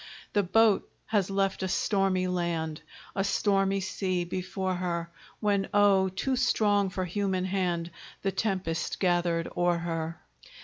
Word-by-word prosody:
The 205 - +4
boat 215 +2 +3 0.2
has 200 -4 +1
left 195 0 0
a 190 - 0
stormy 195 -1 +1
land, 170 -3 -2 0.3
A 195 - +1
stormy 195 -1 +1
sea 185 -1 -1
before 185 +1 -3
her, 170 -2 -2 0.3
When, 200 -2 +1
oh! 195 -2 +5
too 260 +8 -1
strong 205 -5 +2
for 185 0 -3
human 185 0 -1
hand, 175 -3 -1 0.3
The 195 - +1
tempest 190 -5 -2
gathered 175 -2 +1
o'er 175 0 +2
her. 165 -1 -3
185 Hz, 135 wpm, -28 LUFS, 175-195 Hz, 0.3 s, oh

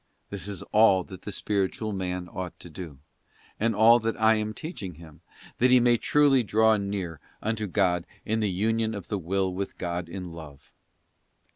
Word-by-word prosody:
This 100 0 -4
is 100 -4 -5
all 105 -4 +5
that 95 +1 -11
the 105 - -6
spiritual 105 +2 -1
man 90 -2 -3
ought 90 -2 -6
to 85 - -11
do—and 85 +7 -6
all 115 +3 +7
that 115 0 -2
I 110 0 +5
am 110 0 -1
teaching 110 - -7
him—that 85 +9 -4
he 125 0 +7
may 120 0 +4
truly 145 0 +4
draw 110 0 +3
near 100 -5 -4 0.2
unto 110 -1 -2
God 90 -2 +1 0.2
in 110 +1 0
the 105 -2 +1
Union 110 +4 0
of 100 - -8
the 105 - -1
will 95 +2 -1
with 95 +1 -5
God 85 -1 -3
in 90 -3 -6
Love. 75 -5 -12
100 Hz, 170 wpm, -27 LUFS, 90-110 Hz, 0.2 s, all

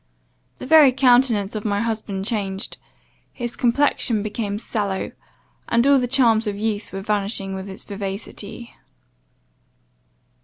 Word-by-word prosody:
The - - -8
very 295 -1 +7
countenance 245 -5 +3
of 215 -1 -4
my 205 -2 0
husband 215 -4 -3
changed; 200 -4 -3 0.5
his 240 -2 -5
complexion 240 -3 +1
became 210 -1 -3
sallow, 205 -3 -3 0.6
and 235 +1 +3
all 280 -1 +5
the 250 - -1
charms 235 -4 +3
of 205 -1 -2
youth 215 0 -3
were 195 - -5
vanishing 200 -1 -1
with 190 +1 -6
its 190 - -8
vivacity. 200 +3 -7
215 Hz, 125 wpm, -22 LUFS, 200-240 Hz, 0.6 s, very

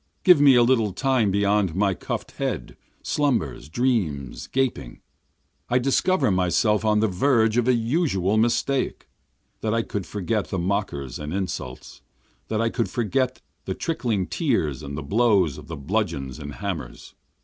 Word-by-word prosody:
Give 180 -6 +7
me 140 -3 +7
a 120 - +6
little 115 -5 +2
time 130 -2 +1
beyond 100 -2 +1
my 100 0 +2
cuff'd - - -5
head, - - -3 0.3
slumbers, 115 - -1
dreams, 85 - -1
gaping, 135 -1 -2 0.7
I 125 - +3
discover 135 - +2
myself 95 +4 +2
on 105 -1 +3
the 110 - +3
verge 110 +2 +2
of 120 0 +2
a 130 - +4
usual 115 - +1
mistake. 120 +4 0 0.5
That 110 0 -1
I 115 - +1
could 100 -4 -5
forget 105 0 -2
the 95 - -3
mockers 85 - -2
and 75 0 -5
insults! 90 -9 -5 0.5
That 110 - -1
I 115 0 +1
could 115 - -1
forget 130 +2 -1 0.2
the 95 - -3
trickling 120 - -1
tears 100 - -1
and 70 -1 -6
the 75 - -4
blows 100 - +2
of 75 - -13
the 80 - -6
bludgeons 70 0 -2
and 75 -1 -7
hammers! 90 - -6
105 Hz, 155 wpm, -24 LUFS, 90-120 Hz, 0.7 s, Give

